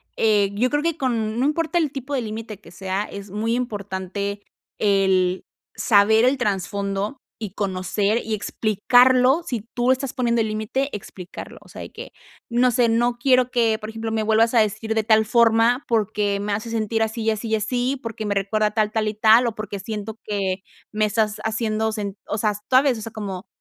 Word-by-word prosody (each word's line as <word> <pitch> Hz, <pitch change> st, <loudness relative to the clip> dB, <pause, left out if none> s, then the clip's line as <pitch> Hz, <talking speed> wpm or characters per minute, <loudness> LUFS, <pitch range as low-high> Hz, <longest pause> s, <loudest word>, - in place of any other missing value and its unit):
eh, 210 Hz, -3 st, +2 dB
yo 240 Hz, +5 st, +1 dB
creo 295 Hz, +2 st, 0 dB
que 335 Hz, -1 st, 0 dB
con 230 Hz, -5 st, -1 dB
No 260 Hz, -, +2 dB
importa 330 Hz, +3 st, +1 dB
el 310 Hz, -5 st, 0 dB
tipo 275 Hz, 0 st, -6 dB
de 265 Hz, -, 0 dB
límite 220 Hz, -2 st, -6 dB
que -, -, -15 dB
sea, 190 Hz, +2 st, -3 dB
es 200 Hz, -2 st, -9 dB
muy 225 Hz, +3 st, -1 dB
importante, 200 Hz, -3 st, -4 dB, 0.3 s
el 190 Hz, -3 st, +2 dB, 0.3 s
saber 220 Hz, +1 st, +4 dB
el 265 Hz, +2 st, +3 dB
trasfondo, 200 Hz, +1 st, -2 dB, 0.3 s
y 195 Hz, -, -5 dB
conocer, 200 Hz, +2 st, 0 dB
y 220 Hz, 0 st, -2 dB
explicarlo 250 Hz, -, +3 dB
si 240 Hz, -8 st, -2 dB
tú 245 Hz, +1 st, +2 dB
estás 260 Hz, 0 st, -1 dB
poniendo 235 Hz, -2 st, +1 dB
el 220 Hz, -, 0 dB
límite, 220 Hz, +6 st, -2 dB
explicarlo, 185 Hz, -2 st, -9 dB
o -, -, -19 dB
sea, -, -, -9 dB
de -, -, -8 dB
que, -, -, -9 dB, 0.4 s
no 245 Hz, +2 st, +3 dB
sé 240 Hz, 0 st, +3 dB
"No 240 Hz, +1 st, +1 dB
quiero 255 Hz, 0 st, +3 dB
que", 230 Hz, -3 st, +1 dB
por 215 Hz, -1 st, -7 dB
ejemplo: 225 Hz, 0 st, -5 dB
"Me 220 Hz, -, 0 dB
vuelvas 220 Hz, +2 st, +3 dB
a 235 Hz, -, +5 dB
decir 220 Hz, +1 st, 0 dB
de 220 Hz, -, +1 dB
tal 220 Hz, 0 st, +4 dB
forma, 235 Hz, +2 st, +3 dB
porque, 210 Hz, -3 st, 0 dB
me 205 Hz, 0 st, -2 dB
hace 215 Hz, +3 st, -3 dB
sentir 225 Hz, 0 st, -1 dB
así, 225 Hz, +1 st, -1 dB
y 220 Hz, -, +2 dB
así, 220 Hz, +2 st, -4 dB
y 220 Hz, -, +1 dB
así, 245 Hz, +5 st, -1 dB
porque, 225 Hz, -2 st, -5 dB
me 200 Hz, -, -1 dB
recuerda 210 Hz, +2 st, +1 dB
tal, 210 Hz, 0 st, 0 dB
tal 215 Hz, -1 st, 0 dB
y 215 Hz, -, -2 dB
tal, 220 Hz, +3 st, +5 dB
o 230 Hz, -, -3 dB
porque 210 Hz, -1 st, -5 dB
siento 215 Hz, +2 st, -6 dB
que 195 Hz, -3 st, -1 dB, 0.3 s
me 215 Hz, 0 st, +1 dB
estás 215 Hz, 0 st, 0 dB
haciendo 220 Hz, 0 st, -1 dB
sen" 205 Hz, -3 st, -4 dB
o 210 Hz, -, -2 dB
sea, 210 Hz, 0 st, +1 dB, 0.2 s
¿sabes?, 260 Hz, -2 st, +4 dB
o -, -, -8 dB
sea, 225 Hz, +1 st, -7 dB
como 195 Hz, -4 st, -6 dB
220 Hz, 200 wpm, -22 LUFS, 205-240 Hz, 0.4 s, a